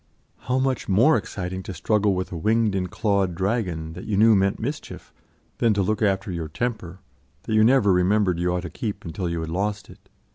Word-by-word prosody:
How 125 +1 -1
much 130 -3 -1
more 120 +11 +5
exciting 95 -1 -4
to 95 0 -7
struggle 105 +3 +1
with 90 0 -3
a - - -5
winged 110 +4 +1
and 90 -2 -2
clawed 100 -4 0
dragon, 90 -5 -2
that 90 - -9
you 105 -2 -1
knew 110 +1 +6
meant 100 0 +1
mischief, 140 +7 -6 0.5
than 115 -3 +3
to 100 - +1
look 110 +4 -1
after 100 -1 0
your 85 -2 -4
temper, 95 -1 -4 0.4
that 110 - -4
you 110 0 +5
never 115 -4 +4
remembered 90 0 +2
you 90 0 0
ought 90 0 -1
to 90 - -7
keep 105 -5 -5
until 85 +2 -3
you 85 -1 -2
had 80 - -5
lost 100 +2 -3
it. - - -19
100 Hz, 210 wpm, -24 LUFS, 90-110 Hz, 0.5 s, knew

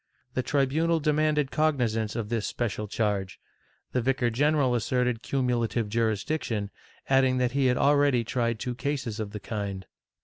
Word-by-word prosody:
The 130 - 0
tribunal 150 +5 +1
demanded 150 -2 +1
cognizance 120 -9 0
of 115 -3 -3
this 115 -3 -1
special 105 -3 -3
charge; 100 -3 -1 0.5
the 125 - 0
vicar 125 -1 +1
general 145 +1 +2
asserted 120 0 0
cumulative 120 -4 0
jurisdiction, 110 0 -1 0.4
adding 135 -1 +3
that 125 -1 +1
he 135 0 +2
had 125 0 +2
already 140 -4 +3
tried 115 0 -1
two 125 +3 -3
cases 130 -4 -3
of 110 -2 -3
the 105 - -7
kind. 100 -2 -4
125 Hz, 145 wpm, -27 LUFS, 110-140 Hz, 0.5 s, adding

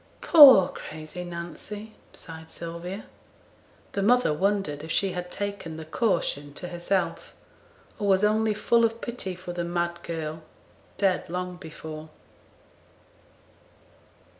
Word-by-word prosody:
'Poor 270 - +9
crazy 155 +3 -8
Nancy!' 175 +5 -7 0.2
sighed 160 -1 -11
Sylvia. 170 +5 -6 0.9
The 200 - -2
mother 245 -4 +4
wondered 195 -4 0
if 160 - -8
she 195 +3 +1
had 180 0 -5
taken 200 -5 -4
the 160 - -7
'caution' 160 - -1
to 180 - -6
herself, 175 +1 -2 0.6
or 205 - -1
was 190 0 +4
only 215 0 +2
full 230 +2 +3
of 230 0 +1
pity 235 -7 -5
for 180 0 -7
the 175 0 -2
mad 170 0 -2
girl, 160 -2 -5 0.6
dead 190 -3 +1
long 180 +1 -3
before. 160 -2 -9
180 Hz, 120 wpm, -26 LUFS, 165-205 Hz, 0.9 s, Poor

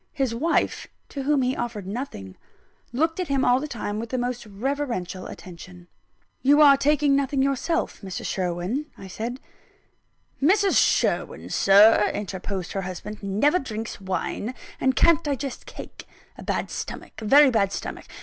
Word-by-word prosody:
His 265 -4 -1
wife 310 +9 0 0.2
(to 280 - -5
whom 280 0 +2
he 255 +1 0
offered 235 -5 -4
nothing) 190 - -6 0.6
looked 320 +8 0
at 365 - -1
him 275 -1 +1
all 245 +1 +4
the 300 - -4
time 210 -5 -4
with 230 +1 -5
the 255 - -2
most 245 -2 -3
reverential 210 -5 -3
attention. 180 0 -11 0.5
"You 285 +3 +5
are 285 -2 +8
taking 285 0 +3
nothing 275 -1 +1
yourself, 300 +5 -1
Mrs. 190 -3 -6
Sherwin," 185 - -2
I - - -10
said. 230 +7 -5 1.0
"Mrs. 390 +6 +4
Sherwin, - - 0
Sir," 210 +2 +6
interposed 190 -2 -4
her 195 - -2
husband, 190 +3 -7
"never 215 - +2
drinks 220 -5 -6
wine, 195 +5 -3 0.2
and 260 0 +2
can't 335 -1 +4
digest 280 -2 -4
cake. - - -10 0.3
A - - -11
bad - - -2
stomach - - -7
a - - -5
very 275 +4 +7
bad 200 -4 +2
stomach. - - -6
245 Hz, 155 wpm, -24 LUFS, 200-280 Hz, 1.0 s, are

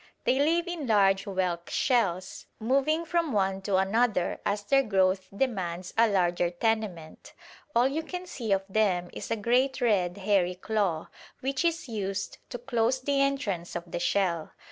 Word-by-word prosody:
They 260 - +2
live 335 +4 +2
in 340 -6 -4
large 195 -3 +3
whelk 185 -3 -2
shells, 190 -8 0
moving 275 +8 +1
from 335 -2 0
one 195 -1 +1
to 195 0 0
another 200 0 +1
as 205 0 -1
their 275 +7 +4
growth 190 -4 +1
demands 185 -6 -2
a 230 +1 +5
larger 175 -3 +1
tenement. 185 -4 -3 0.4
All 240 +2 +5
you 290 +4 -2
can 360 +3 -6
see 240 - -5
of 195 0 +2
them 190 -4 +1
is - - -7
a - - +1
great 250 +5 +1
red 195 -7 +1
hairy 190 -3 +1
claw, 190 -4 -1 0.3
which 270 +3 -1
is 335 -3 0
used 200 -4 -4
to 245 - -5
close 240 0 0
the 275 +1 +1
entrance 225 - -1
of 175 0 -6
the - - -2
shell. 175 -2 0
205 Hz, 165 wpm, -28 LUFS, 185-260 Hz, 0.4 s, a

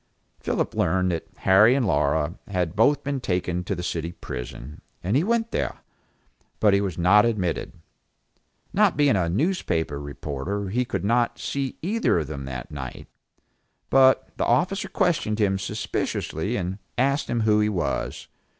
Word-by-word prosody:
Philip - - -1
learned 90 +2 +1
that 85 - -3
Harry 105 +6 +5
and 135 -3 +1
Laura 75 -2 +1
had 90 -4 -2
both 140 +6 +3
been 140 -1 -2
taken 90 -5 -1
to 100 - -2
the 90 - -5
city 85 -1 -3
prison, 60 +2 -8 0.2
and 95 +6 0
he 145 - +3
went 230 +2 0
there; - - -2 0.8
but 105 -2 +4
he 100 - +3
was 95 -5 -3
not 90 +4 +5
admitted. 100 -7 -1 1.0
Not 205 -2 +3
being 145 -6 +4
a 90 -3 +1
newspaper 85 - -1
reporter, 75 +8 -4
he 125 +5 0
could 95 -4 -3
not 120 +2 +2
see 135 -2 -3
either 210 - +1
of 80 - 0
them 70 -2 -6
that 65 -2 -6
night; 65 -4 -7 0.9
but 130 0 +5
the - - 0
officer 190 - +1
questioned 155 - +1
him 95 -3 +1
suspiciously 100 +1 -2
and 95 -1 -3 0.2
asked 140 +3 +1
him 120 -1 0
who 105 -1 +3
he 105 0 +2
was. 95 -5 -2
100 Hz, 160 wpm, -25 LUFS, 85-125 Hz, 1.0 s, Harry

